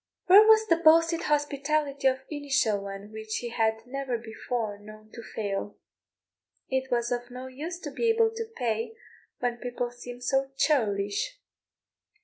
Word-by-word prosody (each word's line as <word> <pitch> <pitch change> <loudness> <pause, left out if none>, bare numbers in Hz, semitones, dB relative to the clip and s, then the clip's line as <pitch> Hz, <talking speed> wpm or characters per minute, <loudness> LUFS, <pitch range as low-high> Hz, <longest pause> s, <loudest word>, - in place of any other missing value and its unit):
Where 410 +4 +8
was 440 0 +7
the 335 -6 +3
boasted 330 0 +4
hospitality 290 -1 0
of 265 0 0
Innishowen, 210 -9 -1
which 220 0 -5
he 240 - -4
had 225 -1 0
never 265 -1 -3
before 220 -1 -4
known 215 +1 -14
to 235 - -9
fail? 205 -2 -4 0.9
It 265 0 -1
was 240 0 0
of 245 0 -2
no 250 +1 -8
use 300 +7 -6
to 295 - -6
be 460 - 0
able 450 0 +4
to 450 0 -6
pay 230 - -1 0.4
when 245 -1 -1
the - - -22
people 245 0 -3
seemed 245 0 -9
so 270 +1 +1
churlish. 240 - +1
250 Hz, 150 wpm, -28 LUFS, 225-300 Hz, 0.9 s, Where